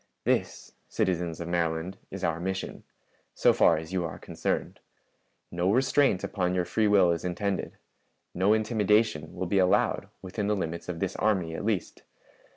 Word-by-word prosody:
"This, - - -1 0.2
citizens 85 -3 -1
of 85 - -5
Maryland, 85 +1 -1
is - - -7
our 80 0 0
mission, 95 +2 -4 0.5
so - - +4
far - - +4
as 80 +3 -7
yon 90 -2 0
are 80 - -6
concerned. - - -3 0.7
No 90 +2 +1
restraint 130 -3 +3
upon 90 -2 -1
your 90 -1 +1
free 110 +3 +1
will 95 -4 +5
is 85 - -2
intended; 95 +2 -2 0.6
no 95 +3 +2
intimidation 110 -6 +1
will 95 - -3
be 95 +2 +1
allowed 90 -1 +2
within 100 +2 -3
the 105 - +2
limits 85 -2 -4
of 85 -2 -5
this 95 -1 -1
army 95 -6 +1
at - - -5
least. 105 -4 -2
95 Hz, 160 wpm, -28 LUFS, 85-105 Hz, 0.7 s, will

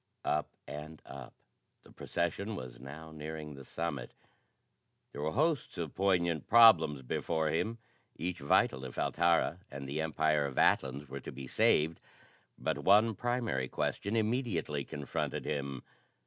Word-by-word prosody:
Up 75 - 0 0.2
and 75 +2 -7
up. 70 -2 -10 0.5
The - - -17
procession 95 +5 -2
was 60 -5 -8
now 75 +5 -9
nearing 75 0 -6
the 70 -1 -10
summit. 75 -3 -4 1.0
There 70 - -6
were 80 +1 -1
hosts 155 +3 +1
of 85 -4 -4
poignant 85 -5 +1
problems 85 - +7
before 80 +5 -1
him, 110 +9 -1 0.4
each 90 +1 -3
vital 70 -2 +2
if 65 -2 -8
Altara 85 0 +2
and 70 0 -7
the 75 +3 -2
Empire 80 -2 +1
of 65 - -8
Atlans 70 +2 +2
were 70 +1 -6
to - - -8
be 65 0 -8
saved; 80 +5 +2 0.6
but 70 - -1
one 105 +8 +5
primary 115 - -1
question 100 - -2
immediately 110 - 0
confronted 70 +1 -3
him. 70 -2 -3
80 Hz, 140 wpm, -32 LUFS, 70-90 Hz, 1.0 s, problems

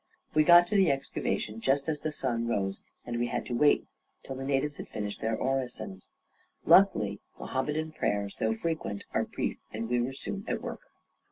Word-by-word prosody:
We 155 - +5
got 175 +2 +8
to 210 - -3
the 195 -3 +5
excavation 115 -5 -2
just 140 +3 +2
as 155 -2 -1
the 155 - -2
sun 120 -5 -1
rose, 95 -4 -1 0.2
and 120 -1 -3
we 120 - +1
had - - -2
to 125 - -4
wait 145 +4 +4 0.4
till 135 - -6
the 135 - -5
natives 140 +1 0
had - - -7
finished 105 -1 -4
their 110 0 0
orisons. 125 -8 -3 0.6
Luckily 105 - +5 0.2
Mohammedan 150 +4 -2
prayers, 100 -8 -1
though 110 0 +2
frequent, 135 -6 -3
are - - +1
brief - - -3
and 115 +1 -3
we 120 0 +3
were 130 +3 -2
soon 195 +8 -5
at - - -1
work. - - -6
130 Hz, 185 wpm, -29 LUFS, 110-150 Hz, 0.6 s, got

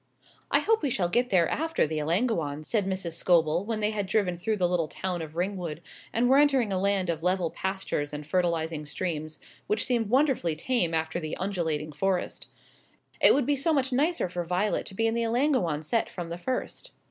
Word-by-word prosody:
"I - - +3
hope 445 0 +2
we 290 - 0
shall 185 -7 0
get 245 +6 +1
there 175 -4 +4
after 325 +1 0
the 155 0 -2
Ellangowans," 160 - 0
said 210 -4 0
Mrs. 185 -3 -2
Scobel, 165 0 +2
when 220 -1 -2
they 210 +1 +1
had 205 -3 -2
driven 190 -3 +1
through 215 +5 -1
the 180 -2 +2
little 175 -3 0
town 180 +1 -4
of 155 -1 -8
Ringwood, 175 -3 -3 0.3
and 235 +2 +2
were 265 +2 +6
entering 270 -8 +3
a 185 - 0
land 195 -2 +1
of 160 -1 -5
level 180 -1 +1
pastures 190 -6 -3
and 150 0 -6
fertilising 165 -3 -1
streams, 155 -1 -3 0.3
which 210 0 +2
seemed 235 -4 0
wonderfully 255 - +2
tame 170 -2 0
after 160 +1 -1
the 155 -2 -5
undulating 160 -6 -2
forest; 185 +4 -2 0.7
"it - - +7
would 280 -2 +1
be 290 - +2
so 285 +4 +1
much 270 -3 +1
nicer 305 - +1
for 175 0 -3
Violet 180 +5 -1
to 190 - -10
be 225 - +1
in 225 - +2
the 235 - 0
Ellangowan 230 - +1
set 225 +9 0
from 175 -2 -6
the 170 - -4
first." 260 - -4
185 Hz, 205 wpm, -27 LUFS, 165-230 Hz, 0.7 s, it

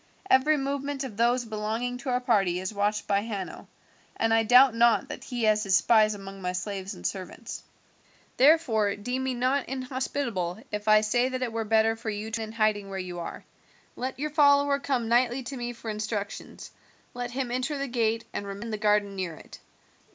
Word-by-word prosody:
Every 295 +4 +5
movement 280 0 -2
of 250 -6 -6
those 240 +2 +2
belonging 225 +3 -3
to 270 +1 -5
our 250 0 +2
party 200 -8 +2
is 190 +3 -4
watched 205 +1 0
by 200 -1 +2
Hanno, 205 -4 -6 0.5
and 225 0 +2
I 225 - +5
doubt 250 +3 +6
not 235 +4 +3
that - - -7
he 245 -3 -3
has 215 -1 +3
his 195 -2 +2
spies 215 +1 +4
among 195 -1 -9
my 180 0 -2
slaves 190 +1 -4
and 90 - -12
servants. 185 - -5 0.8
"Therefore 250 -8 +4
deem 250 +5 -3
me 260 -1 -1
not 255 +3 0
inhospitable 255 -8 -3
if 210 0 -4
I 215 0 +6
say 240 +4 +1
that 255 0 -3
it 235 -3 -3
were 225 -1 -2
better 220 +1 +3
for 225 0 -5
you 215 +1 -4
to 225 0 -2
remain 220 0 -6
in - - -13
hiding 210 -2 +1
where 195 - -5
you 180 -2 -5
are. 170 - -7 0.5
Let 260 +2 -4
your 300 +2 -3
follower 285 -1 +4
come 260 -5 -1
nightly 245 +2 +2
to 270 +3 -6
me 240 -1 -4
for 230 -2 -6
instructions; 210 -1 -5 0.4
let 245 -1 -4
him 250 0 -3
enter 255 +4 -1
the 275 0 -2
gate 230 -2 0
and 200 - -4
remain 200 +2 -6
in 230 - -5
the 215 - -2
garden 210 -2 +2
near 185 -4 -3
it. - - -13
225 Hz, 205 wpm, -27 LUFS, 205-255 Hz, 0.8 s, doubt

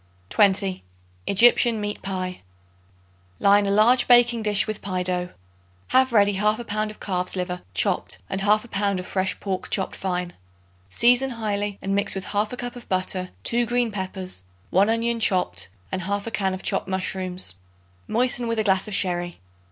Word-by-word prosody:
20. 195 -2 +3 0.4
Egyptian 235 +2 +5
Meat 205 0 -4
Pie. 185 -2 -4 1.0
Line 200 0 +4
a - - +1
large 230 +5 +4
baking 240 -1 +5
dish 210 -2 +2
with 215 -1 -5
pie 185 -2 -2
dough. 180 0 -2 0.6
Have 260 0 +4
ready 205 -3 +3
1/2 215 +3 +1
pound 215 0 -2
of 215 - -11
calf's 180 -2 -1
liver 180 -1 -3
chopped, - - 0
and 190 - -3
1/2 215 +3 +2
pound 200 -1 0
of 180 - -6
fresh 190 0 -1
pork 190 -2 -4
chopped 190 - -1
fine. 180 -2 -3 0.6
Season 245 - +3
highly 205 -4 -3
and 195 0 -1
mix 200 0 +1
with 190 -1 -4
1/2 210 +4 0
cup 245 0 -5
of 245 - -12
butter, 185 0 -2
2 240 +1 +1
green 240 -1 +1
peppers, 190 - -4 0.3
1 195 +4 +4
onion 230 +1 0
chopped 95 - +1 0.2
and 190 - -2
1/2 200 +4 -3
can 195 -2 0
of 185 - -9
chopped - - 0
mushrooms. 185 - -2 0.5
Moisten 245 +1 +1
with 230 0 -1
a 220 - +1
glass 190 -1 +1
of 210 - -2
sherry. 175 -3 -1
200 Hz, 165 wpm, -24 LUFS, 185-225 Hz, 1.0 s, Egyptian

